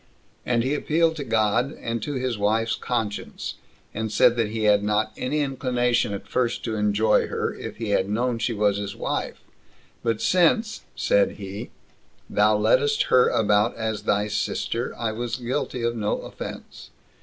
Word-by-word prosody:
And 120 -1 +2
he 135 +3 0
appealed 160 +2 +1
to 145 - -3
God, 115 +3 +1
and 115 -1 -3
to 145 - -3
his 130 -2 -1
wife's 110 +2 +1
conscience; 110 -4 -3 0.4
and 110 0 -3
said 120 +2 +5
that 115 -3 0
he 110 0 -3
had 105 -1 +4
not 105 +1 +1
any 150 +4 -1
inclination 125 -5 0
at 100 - -6
first 120 -2 -1
to 115 - -2
enjoy 105 +1 +2
her, - - -2
if - - -8
he 115 -2 -4
had 95 -1 +1
known 120 +2 0
she 120 - 0
was 105 -2 +1
his 100 -1 -4
wife; - - -3 0.6
but 115 -2 0
since, 185 +5 +2
said - - +2
he, - - -7 0.6
thou - - +3
leddest 445 -3 +3
her 125 -1 +6
about 105 +1 +2
as 110 -2 -2
thy 105 0 +1
sister, 115 +3 -2
I 115 -2 -1
was 120 +1 -3
guilty 125 0 -3
of 120 0 0
no 105 -2 -1
offense. - - -9
115 Hz, 165 wpm, -24 LUFS, 105-125 Hz, 0.6 s, her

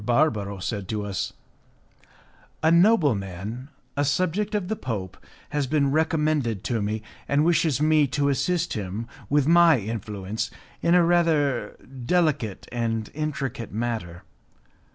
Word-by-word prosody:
Barbaro 110 -5 +1
said 100 +1 -4
to 105 0 -3
us, 100 -2 -3 1.3
"A 160 - +5
nobleman, 125 - +2 0.3
a 145 - +1
subject 185 +8 0
of 200 -4 -1
the 220 - -1
Pope, 105 - -4 0.3
has 145 -2 -1
been 140 -1 +2
recommended 150 - +1
to 115 -3 -1
me, 105 +1 -2 0.2
and 145 +2 +2
wishes 165 -5 +2
me 155 -1 +4
to 140 +2 0
assist 165 +5 0
him 105 +2 -4 0.2
with 145 -1 +3
my 170 -1 +6
influence 105 -1 -4 0.3
in 170 +1 +3
a 175 -1 +5
rather 165 -5 +2 0.3
delicate 155 - +1
and 115 -2 -2
intricate 140 -6 -3
matter. 110 -6 -3
140 Hz, 130 wpm, -25 LUFS, 110-160 Hz, 1.3 s, my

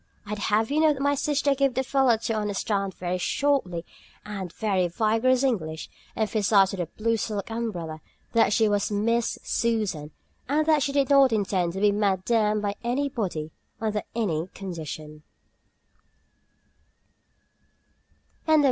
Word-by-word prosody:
I'd 210 0 -4
have 215 +3 +1
you 300 - +2
know 310 -1 +5
that 275 - -8
my 285 +1 +2
sister 285 0 +1
gave 275 -2 +1
the 265 - +1
fellow 265 -3 +3
to 225 +1 -2
understand 205 -2 -1
very 180 0 -3
shortly 190 -9 0 0.4
and 195 -3 -5
in - - -22
very 195 -5 +1
vigorous 225 +7 +2
English 160 -12 -2 0.2
(emphasized 210 -3 +3
with 195 - -5
her 170 -2 -4
blue 230 +1 +1
silk 210 -1 -3
umbrella) 175 -9 -4 0.3
that 230 -3 +4
she 220 +1 +3
was 205 0 0
Miss 230 +3 +1
Susan, 215 -10 -1 0.4
and 305 +2 +2
that 310 -2 +4
she 280 0 0
did 280 -1 +1
not 275 -2 +6
intend 190 -5 0
to 190 - -4
be 205 0 +4
Madamed 210 +1 +1
by 200 -1 0
anybody, 235 - -2 0.3
under 215 -1 -1
any 175 -8 -1
condition. 155 -5 -7
215 Hz, 140 wpm, -26 LUFS, 190-245 Hz, 0.4 s, not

